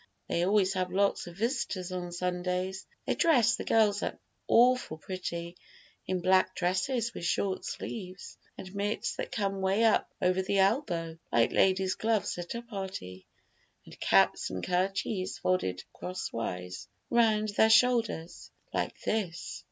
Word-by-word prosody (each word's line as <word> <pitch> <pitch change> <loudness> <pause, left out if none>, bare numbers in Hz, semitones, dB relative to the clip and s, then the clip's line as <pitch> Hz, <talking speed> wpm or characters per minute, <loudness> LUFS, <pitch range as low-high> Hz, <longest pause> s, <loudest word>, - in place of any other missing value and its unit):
They 170 - 0
always 195 0 +3
have 185 -1 -1
lots 195 -1 +1
of 170 0 -10
visitors 215 -6 -2
on 180 -1 -4
Sundays. 180 +1 -2 0.2
They - - +1
dress 250 -9 +4
the - - -5
girls 210 -2 +3
up - - -3 0.3
awful 245 -8 +4
pretty 170 -1 -5 0.5
in 185 -1 -1
black 185 +1 +3
dresses 220 +7 0
with - - -7
short 190 +2 0
sleeves, 185 -3 -6 0.2
and 185 0 -9
mitts 205 +1 -2
that - - -4
come 195 -2 -1
way 195 +4 +2
up 225 -2 +3
over 185 +1 +2
the 195 +1 -1
elbow, 190 - +1
like 115 -1 +3
ladies' 190 0 +3
gloves 220 -2 0
at 175 +5 -5
a 235 - -5
party, 190 - -7 0.6
and - - -14
caps - - +3
and 95 -1 -5
kerchiefs 185 +1 -1
folded 95 - 0
crosswise 90 - -5 0.2
round 220 -2 +3
their 220 +2 +4
shoulders, 225 -7 +2 0.2
like - - -2
this." 190 -6 -2
190 Hz, 145 wpm, -30 LUFS, 180-215 Hz, 0.6 s, dress